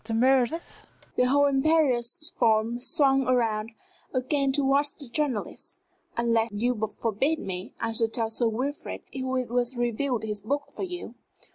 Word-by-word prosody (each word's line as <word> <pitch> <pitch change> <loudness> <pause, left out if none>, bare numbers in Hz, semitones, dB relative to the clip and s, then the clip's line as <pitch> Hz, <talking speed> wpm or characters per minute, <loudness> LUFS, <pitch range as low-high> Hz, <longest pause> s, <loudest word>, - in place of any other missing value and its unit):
Dr. 225 0 -3
Meredith," 260 +5 +1 0.3
the 250 - +3
whole 285 +2 +4
imperious 285 +1 +2
form 225 0 +2
swung 270 +1 +3
round 230 -3 +1 0.4
again 275 +2 +1
towards 280 +1 +2
the 285 - -7
journalist, 255 -3 -2 0.4
"unless 230 -1 +2
you 235 +5 +1 0.3
forbid 250 +8 +1
me, 185 -6 -6
I 230 -1 -1
shall 225 0 +2
tell 225 0 -1
Sir 235 +1 +1
Wilfrid 255 +6 -3
who 260 -1 -2
it 255 -2 -2
was 245 +1 +1
reviewed 240 0 0
his 210 -2 -3
book 285 +7 -2
for - - -8
you." 360 -1 -5
250 Hz, 150 wpm, -27 LUFS, 225-280 Hz, 0.4 s, whole